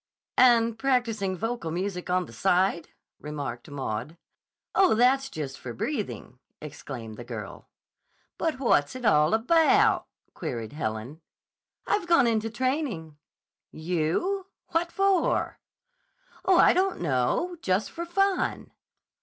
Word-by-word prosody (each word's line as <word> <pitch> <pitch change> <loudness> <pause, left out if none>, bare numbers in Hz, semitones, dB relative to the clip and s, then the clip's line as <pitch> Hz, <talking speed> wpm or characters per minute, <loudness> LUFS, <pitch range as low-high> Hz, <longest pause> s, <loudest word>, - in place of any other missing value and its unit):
"And 230 -2 +5
practicing 225 -8 0
vocal 225 -4 -3
music 180 +2 -3
on 180 0 +1
the - - -14
side," 185 -2 +1 0.3
remarked 145 -5 -6
Maud. 135 +2 -4 0.6
"Oh, 375 - +4
that's 265 +4 +3
just 140 - -6
for 120 - -7
breathing," 210 - -4 0.2
exclaimed 130 -7 -8
the 120 - -7
girl. 115 -5 -8 0.7
"But 320 -4 0
what's 145 - +2
it 255 -2 -6
all 150 +1 +4
about?" 330 - +3 0.3
queried 115 0 -5
Helen. 125 +2 -4 0.6
"I've 410 -4 0
gone 335 -7 +5
into 225 -1 +1
training." 235 - -2 0.5
"You! 180 - -1 0.2
What 340 +1 0
for?" 390 -2 +1 0.9
"Oh, 375 -2 +5
I - - +6
don't 375 +1 +1
know. 165 - 0
Just 190 +3 0
for 340 - -5
fun." 390 +3 0
205 Hz, 120 wpm, -27 LUFS, -, 0.9 s, I